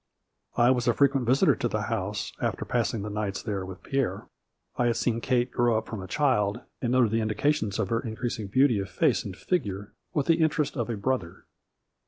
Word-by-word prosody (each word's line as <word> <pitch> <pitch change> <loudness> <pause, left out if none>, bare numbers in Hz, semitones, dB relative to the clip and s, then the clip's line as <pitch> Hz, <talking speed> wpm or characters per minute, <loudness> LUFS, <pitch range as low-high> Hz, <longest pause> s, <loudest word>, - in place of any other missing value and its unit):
I 120 +1 +5
was 125 -1 0
a 120 - +3
frequent 140 -3 +2
visitor 130 +3 +5
at - - -2
the - - -1
house, - - -3
after - - -1
passing 115 -3 -1
the 105 - -4
nights 105 -2 -3
there 100 -3 -2
with 95 -1 -9
Pierre. 135 -2 -1 0.5
I 120 - +1
had 120 - +1
seen 115 -1 0
Kate 125 0 +1
grow 120 -2 +2
up 110 - -2
from 110 -4 -6
a 95 - -7
child, 120 -4 +1 0.2
and 120 - 0
noted 125 -4 +3
the 115 0 +1
indications 110 0 0
of - - -1
her 115 -1 +1
increasing 110 -2 -4
beauty 125 +1 +3
of 95 - -4
face - - +2
and 95 - -7
figure 105 - -2 0.2
with 145 -3 0
the 165 0 +3
interest 155 -2 +1
of 120 -3 -2
a 115 - -2
brother. 100 -5 -2
120 Hz, 210 wpm, -27 LUFS, 105-130 Hz, 0.5 s, I